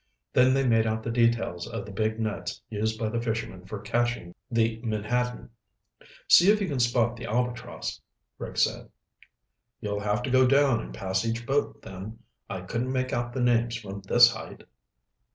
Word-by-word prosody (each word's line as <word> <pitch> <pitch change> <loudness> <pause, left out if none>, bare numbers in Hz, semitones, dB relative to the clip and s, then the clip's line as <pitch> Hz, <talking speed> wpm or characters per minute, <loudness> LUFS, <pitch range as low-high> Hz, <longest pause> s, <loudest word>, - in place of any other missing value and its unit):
Then 130 +1 +5
they 135 0 +2
made 115 -2 +3
out 110 0 -1
the 115 - -2
details 115 -7 +1
of 115 -4 -5
the 105 - -9
big 110 +2 -1
nets 110 -2 -3
used 110 +1 -1
by 110 -1 -1
the 115 +1 -2
fishermen 110 -5 -4
for 105 - -5
catching 120 -3 -1 0.2
the 115 -1 +1
menhaden. 120 +3 -2 0.8
"See 175 +3 +7
if 215 - +2
you 200 - -1
can 140 -5 -2
spot 120 -1 +2
the 120 - -7
Albatross," 120 +1 -3 0.4
Rick - - -7
said. - - +1 0.9
"You'll 105 -2 -3
have 105 +3 -1
to 130 - -2
go 130 0 +5
down 135 -2 +4
and - - -8
pass 95 - -2
each 115 0 -2
boat, 140 +3 -1
then. 95 +4 -8 0.3
I 95 - -4
couldn't 115 +7 -3
make 130 +1 -1
out 120 0 -1
the 130 - -2
names 120 -1 +2
from 100 -3 -7
this - - +7
height." - - -9
115 Hz, 180 wpm, -27 LUFS, 105-125 Hz, 0.9 s, See